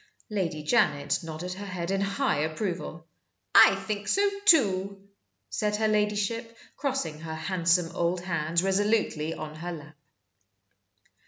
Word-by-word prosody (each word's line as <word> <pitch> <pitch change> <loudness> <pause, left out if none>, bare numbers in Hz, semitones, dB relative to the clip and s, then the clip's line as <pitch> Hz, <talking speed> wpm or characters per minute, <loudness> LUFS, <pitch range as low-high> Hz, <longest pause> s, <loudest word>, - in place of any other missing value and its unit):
Lady 165 -7 -2
Janet 150 -7 +2
nodded 165 +2 -6
her 200 +2 -7
head 180 -1 -4
in 195 0 0
high 200 - 0
approval. 165 +1 -3 0.5
"I 195 - +8
think 205 +1 -4
so, 405 +1 +3 0.2
too," 195 - +3 0.4
said 210 - 0
her 220 +1 +1
ladyship, 215 +2 -1 0.2
crossing 265 - -2
her 160 0 -6
handsome 170 0 +1
old 175 +1 0
hands 170 -1 0
resolutely 195 -5 +1
on 155 0 -7
her 175 +3 -5
lap. 155 -2 -10
185 Hz, 130 wpm, -27 LUFS, 165-210 Hz, 0.5 s, I